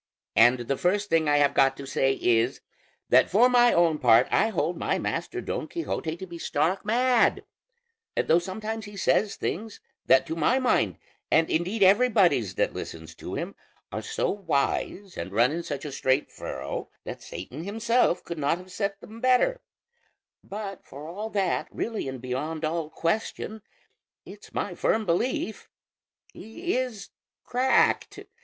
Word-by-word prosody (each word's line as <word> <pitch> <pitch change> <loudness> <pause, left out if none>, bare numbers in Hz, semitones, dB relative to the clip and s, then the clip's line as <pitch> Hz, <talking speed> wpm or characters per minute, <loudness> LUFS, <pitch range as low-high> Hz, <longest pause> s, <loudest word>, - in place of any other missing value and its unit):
And 120 +2 +6
the 130 +3 -2
first 200 +3 0
thing 160 -2 +3
I 145 - +4
have 145 -1 +3
got 135 0 +3
to 140 - -7
say 135 0 +1
is, 120 0 +1 0.5
that - - +5
for 225 +7 +5
my 245 -1 +5
own 165 -3 +3
part 120 0 +5
I - - +4
hold 175 -4 -1
my - - -1
master - - -3
Don - - -4
Quixote 170 - -3
to 190 - -7
be 170 -2 -9
stark 165 +5 0
mad, 245 +3 +2 0.7
though 165 - +4
sometimes 215 +5 -5
he 205 -1 -10
says 205 +1 +2
things 215 +4 -4 0.3
that 170 - +5
to 160 -1 -4
my 165 +11 +2
mind, 255 -1 +1 0.3
and 160 0 +3
indeed 190 +6 +1
everybody's 220 +6 +4
that - - 0
listens - - -7
to - - -7
him, - - -4 0.4
are - - -3
so 445 -1 -1
wise 190 +1 -2
and 95 - -5
run 120 +6 +3
in 170 +2 -2
such 145 -3 -5
a 150 - -5
straight 130 +1 0
furrow - - -5
that - - -7
Satan 125 - -8
himself 225 0 +1
could 170 -2 -6
not 145 +3 +1
have 185 +1 -13
said 200 +1 -2
them 225 +2 -11
better; 255 - +3 0.8
but 200 -2 -7
for 145 +3 -10
all 205 +6 -5
that, 195 -4 0
really 225 -9 -3
and 130 -1 -5
beyond 150 +6 -3
all 160 0 -2
question, 215 +5 -2 0.6
it's - - -13
my - - -3
firm 220 0 0
belief 220 +5 -1 0.6
he 340 +12 -4
is 250 -6 -3 0.3
cracked. 255 +2 +2
180 Hz, 160 wpm, -26 LUFS, 150-220 Hz, 0.8 s, And